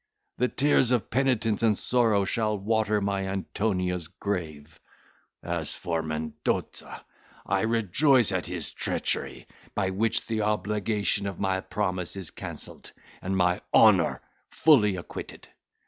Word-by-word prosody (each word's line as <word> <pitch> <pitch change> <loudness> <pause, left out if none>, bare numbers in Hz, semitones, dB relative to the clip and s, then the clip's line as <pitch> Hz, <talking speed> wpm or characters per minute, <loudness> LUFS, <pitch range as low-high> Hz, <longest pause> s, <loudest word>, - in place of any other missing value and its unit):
The 125 - +3
tears 135 -2 +2
of 125 -3 0
penitence 125 -5 +1
and 110 -3 +3
sorrow 115 -5 +2
shall 110 +1 0
water 105 +1 +1
my 100 -1 -1
Antonia's 90 -3 -2
grave; 80 -6 -5 0.6
as 85 -2 -3
for 85 -3 -2
Mendoza, 80 0 -4 0.4
I 100 0 +1
rejoice 115 - +3
at 95 -2 -2
his 85 -4 -2
treachery, - - -2 0.3
by 95 -2 0
which 110 +4 +1
the 110 -1 -2
obligation 105 0 0
of 100 -3 -6
my 95 -1 0
promise 90 -4 -2
is 95 -4 -4
cancelled, - - -9 0.3
and 95 +1 -2
my 90 -1 +2
honour - - +5 0.3
fully 110 -11 +4
acquitted. 90 - -8
100 Hz, 125 wpm, -27 LUFS, 90-110 Hz, 0.6 s, honour